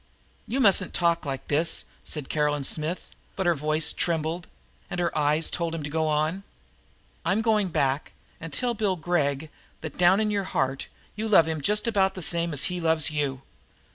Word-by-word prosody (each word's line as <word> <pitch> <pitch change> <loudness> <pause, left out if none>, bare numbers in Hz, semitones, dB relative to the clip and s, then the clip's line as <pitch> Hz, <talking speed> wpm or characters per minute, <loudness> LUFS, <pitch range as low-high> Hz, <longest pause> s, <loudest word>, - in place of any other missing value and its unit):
"You 260 - -1
mustn't 195 -6 +4
talk 170 -3 +1
like 135 -1 -4
this," 160 +3 +1 0.2
said 150 -4 -5
Caroline 150 -1 0
Smith, 155 +6 0 0.2
but 190 - -2
her 175 - +4
voice 155 +1 +1
trembled, 165 +1 -1 0.4
and 175 - -4
her 170 -1 -1
eyes 150 +1 +2
told 170 -1 -2
him 160 - -5
to 145 - -5
go 160 0 0
on. 155 +5 0 0.8
"I'm 215 +3 +1
going 215 -3 +2
back 140 -4 0 0.3
and 165 -1 -8
tell 240 - 0
Bill 210 -4 0
Gregg 155 -3 -1 0.3
that, 160 0 -7
down 180 +3 +5
in 215 -1 +1
your 200 -2 -1
heart, 135 -4 -1 0.3
you 215 +2 -3
love 195 -7 +6
him 160 -2 -2
just 210 +8 +1
about 195 -4 +2
the 185 - -4
same 170 0 +1
as 145 -3 0
he 180 -1 -2
loves 160 -1 +2
you!" 140 -3 -2
165 Hz, 185 wpm, -26 LUFS, 150-185 Hz, 0.8 s, love